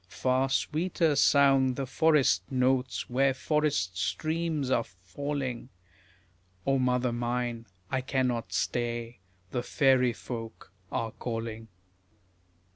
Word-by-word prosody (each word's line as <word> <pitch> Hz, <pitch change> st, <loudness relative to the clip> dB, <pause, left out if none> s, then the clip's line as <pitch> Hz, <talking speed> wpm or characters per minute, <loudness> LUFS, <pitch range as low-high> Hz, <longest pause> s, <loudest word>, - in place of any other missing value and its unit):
Far 130 Hz, +3 st, +1 dB
sweeter 160 Hz, +3 st, +1 dB
sound 135 Hz, -2 st, +4 dB
the 135 Hz, -, -2 dB
forest 135 Hz, -, +3 dB
notes 130 Hz, 0 st, +1 dB
where 135 Hz, +2 st, +2 dB
forest 150 Hz, -, 0 dB
streams 155 Hz, -, -1 dB
are 120 Hz, -3 st, +3 dB
falling; 125 Hz, +7 st, -5 dB, 1.0 s
O 135 Hz, 0 st, +2 dB
mother 125 Hz, -1 st, +1 dB
mine, 120 Hz, -1 st, -2 dB, 0.2 s
I 130 Hz, -, 0 dB
cannot 125 Hz, -6 st, -1 dB
stay, 120 Hz, +3 st, -2 dB, 0.3 s
the 125 Hz, -, -1 dB
fairy 130 Hz, -2 st, +3 dB
folk 115 Hz, -4 st, -8 dB, 0.2 s
are 115 Hz, -1 st, -2 dB
calling. 115 Hz, -1 st, -5 dB
125 Hz, 105 wpm, -29 LUFS, 120-135 Hz, 1.0 s, sound